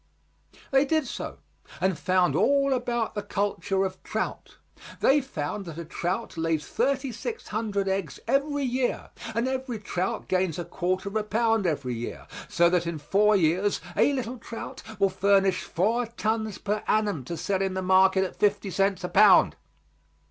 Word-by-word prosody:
They 270 0 +5
did 310 +1 +1
so, - - -6 0.4
and 190 -1 +1
found 185 +1 +2
all 275 -1 +3
about 240 -2 -1
the 205 - -3
culture 200 -1 -1
of 185 -1 -5
trout. - - -4 0.4
They 285 +2 +4
found 200 - -4
that 165 -2 -8
a 170 - -5
trout 180 +5 -3
lays 160 -2 0
thirty 275 -1 0
six 445 - -6
hundred 210 -2 -1
eggs 190 -2 -2
every 280 +3 +1
year 255 -1 -1 0.2
and 235 +2 +1
every 260 -2 -3
trout 190 -2 -3
gains 185 -3 0
a 175 - -4
quarter 185 +3 -2
of 200 - -6
a 215 - +1
pound 225 -1 +1
every 140 -6 -1
year, 120 0 -6 0.2
so 170 - +4
that 175 -2 +1
in 170 -1 -3
four 210 +7 +3
years 185 +3 +2 0.2
a - - +4
little 255 -2 -3
trout 230 0 -8 0.2
will 195 -1 +4
furnish 195 0 +2
four 225 +7 0
tons 220 -2 -2
per 210 +1 -2
annum 205 -10 +1
to 170 +5 -5
sell 190 +4 -1
to 195 0 +1
the 190 0 -3
market 190 +1 +4
at 185 - -4
fifty 205 -1 +1
cents 195 +1 +1
a - - -1
pound. 200 -2 +6
200 Hz, 170 wpm, -26 LUFS, 185-230 Hz, 0.4 s, pound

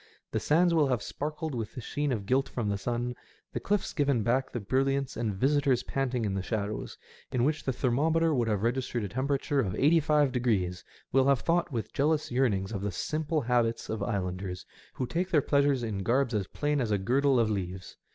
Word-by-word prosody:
The - - 0
sands 170 +3 +3
wiU 150 -4 +3
have 125 -5 0
sparkled 150 +1 -4
with 115 -4 -4
the - - -5
sheen 145 +4 -2
of 105 -5 -2
gilt 130 +5 +1
from 115 -4 -2
the 100 - 0
sun, 120 +3 -2 0.4
the - - -2
cliffs 205 -1 -1
given 140 -7 +1
back 130 +4 +1
the 120 - -3
brilliance, 135 +5 0
and 115 -2 -1
visitors 135 +2 +2
panting 125 -4 -1
in 100 - -1
the 95 - -1
shadows, 105 +1 -3 0.3
in 125 -2 +1
which 150 +3 0
the 135 - +1
thermometer 155 +6 +2
would 120 -4 +1
have 105 -2 0
registered 120 -1 -1
a - - -2
temperature* 140 +3 0
of 95 -8 0
eighty 160 +4 +4
five 150 -2 +3
degrees, 100 -8 0 0.3
will 135 +1 +4
have 140 -2 +3
thought 170 0 +1
with 115 -4 -4
jealous 150 +1 +1
yearnings 110 -7 +1
of 100 -4 -3
the 100 0 -2
simple 155 - -1
habits 120 -2 0
of 110 - -3
islanders, 90 -3 -3 0.3
who 130 - -2
take 175 +8 -2
their 160 - +4
pleasures 140 -2 +2
in 105 -4 -2
garbs 125 +5 +1
as 100 -4 -1
plain 145 -1 -1
as 115 - -1
a 105 - +2
girdle 130 +6 +2
of 110 -2 +2
leaves. 95 -2 -4
125 Hz, 210 wpm, -29 LUFS, 110-145 Hz, 0.4 s, eighty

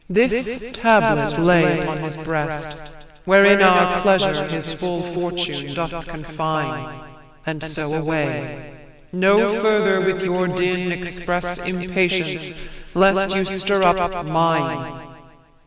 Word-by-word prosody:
This 235 +3 0
tablet 225 -1 +3
lay 165 -1 +4
upon 155 0 -4
his 155 -1 -6
breast, 155 -1 -5 0.4
wherein 200 +1 +6
Our 180 -1 +5
pleasure 190 -6 +2
his 160 0 -5
full 175 +2 -4
fortune 175 -4 -4
doth 165 0 -5
confine; 155 -1 -5 0.4
And 160 -1 -5
so, 155 -1 -5
away; 150 -2 -4 0.4
no 200 +3 +2
farther 210 -3 +2
with 190 0 -1
your 185 0 -1
din 180 0 -1
Express 175 0 -4
impatience, 180 -1 -2 0.4
lest 195 +1 +3
you 190 -1 0
stir 195 +1 -1
up 175 0 +1
mine. 165 +1 -1
175 Hz, 110 wpm, -20 LUFS, 160-190 Hz, 0.4 s, wherein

